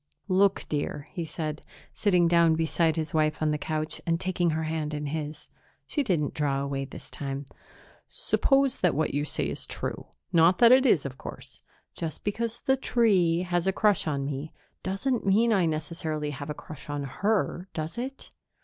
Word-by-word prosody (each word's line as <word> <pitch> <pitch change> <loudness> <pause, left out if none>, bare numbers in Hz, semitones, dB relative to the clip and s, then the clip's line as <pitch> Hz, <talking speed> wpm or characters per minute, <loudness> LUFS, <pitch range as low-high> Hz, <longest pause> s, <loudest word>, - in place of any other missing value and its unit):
"Look, 195 +1 +3
dear," 145 0 -3
he 170 - -4
said, 155 -1 -4 0.3
sitting 180 -5 +3
down 170 -1 +5
beside 160 0 +1
his 160 -2 -3
wife 155 -1 +2
on 155 -1 +1
the 150 - -1
couch 155 +1 -3
and 165 -1 0
taking 180 -2 0
her 160 0 -1
hand 155 -1 -2
in 150 0 -3
his. 150 0 -5 0.3
She 295 - -1
didn't 170 - 0
draw 140 -2 0
away 140 0 -2
this 135 - -11
time. 140 0 -4 0.6
"Suppose 275 - +2
that 180 -5 +2
what 155 - 0
you 145 +1 0
say - - 0
is - - -3
true - - -4 0.3
not 170 +2 +5
that 235 -1 +7
it 260 +1 +6
is, 160 - +4
of 130 -1 -6
course. - - -9 0.3
Just 160 -3 -5
because 230 +3 -2
the 265 0 +2
tree 190 -10 +3
has 175 0 0
a - - +4
crush 205 -3 +2
on 140 -2 -1
me 140 +2 -4 0.3
doesn't 225 +6 -1
mean 220 +4 +4
I 185 -5 +3
necessarily 155 -1 -3
have 145 +1 -7
a 150 - -3
crush 150 -2 -10
on 145 -1 -2
her, 190 - -1
does 160 +7 -4
it?" 265 +2 -6
160 Hz, 185 wpm, -27 LUFS, 150-195 Hz, 0.6 s, that